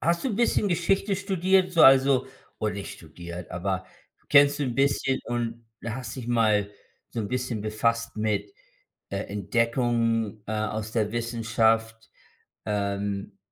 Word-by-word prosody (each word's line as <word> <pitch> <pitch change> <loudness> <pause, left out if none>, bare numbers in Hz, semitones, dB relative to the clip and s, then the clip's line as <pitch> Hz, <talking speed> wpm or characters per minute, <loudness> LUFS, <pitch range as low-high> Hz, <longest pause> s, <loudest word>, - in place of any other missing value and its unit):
hast 170 +1 +1
du 245 - 0
bisschen 220 -2 +2
Geschichte 195 +3 +1
studiert, 190 -1 +2
so 170 - +5
also, 135 -1 +6 0.3
oder 105 -1 -1
nicht 100 0 -6
studiert, 85 +2 -9
aber 95 +1 -2 0.4
kennst 145 0 +6
du - - +2
'n 125 -4 -2
bisschen 135 -1 +2
und 120 -1 -3 0.2
hast 115 0 -5
dich 125 -3 -7
mal 110 -4 +2 0.4
so 120 - -6
'n 105 - -2
bisschen 125 -3 -2
befasst 115 +2 -1
mit, 105 -2 -1 0.6
äh, 100 - -3
Entdeckungen, 115 0 0
äh, 110 - -4
aus 110 0 -3
der 110 -3 0
Wissenschaft, 115 -1 0 0.5
ähm, 100 -1 -3
115 Hz, 140 wpm, -26 LUFS, 105-135 Hz, 0.6 s, also